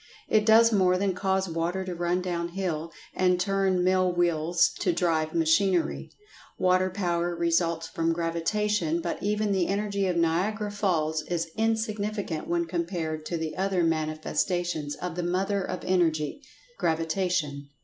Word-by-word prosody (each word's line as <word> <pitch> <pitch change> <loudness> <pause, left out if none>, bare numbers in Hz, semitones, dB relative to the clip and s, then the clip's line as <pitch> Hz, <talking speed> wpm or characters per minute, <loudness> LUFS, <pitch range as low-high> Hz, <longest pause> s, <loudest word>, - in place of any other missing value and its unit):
It 215 0 +2
does 230 +1 +7
more 185 -3 +3
than 195 0 0
cause 190 0 0
water 170 +3 -2
to 185 - -4
run 175 +1 -1
down 170 -2 -2
hill, 165 -4 -2 0.2
and 180 -1 +2
turn 190 -1 +1
mill 185 0 +3
wheels 175 0 +2
to - - +2
drive 165 -2 0
machinery. 170 +2 +2 0.5
Water 185 0 +3
power 175 -2 -1
results 170 -1 0
from 165 0 -1
Gravitation, 170 +1 0
but 170 0 -4
even 210 0 0
the 190 -3 +1
Energy 200 -1 -1
of 180 -2 0
Niagara 195 +6 0
Falls 160 -6 0
is 165 -2 -2
insignificant 215 -5 -1
when 170 0 0
compared 165 -2 -3
to 170 - -2
the 160 -1 -4
other 190 -2 0
manifestations 155 0 -1
of 180 -2 -5
the 180 - -2
Mother 190 +3 0
of 185 -1 -5
Energy—Gravitation. 165 - -1
175 Hz, 140 wpm, -27 LUFS, 165-195 Hz, 0.5 s, does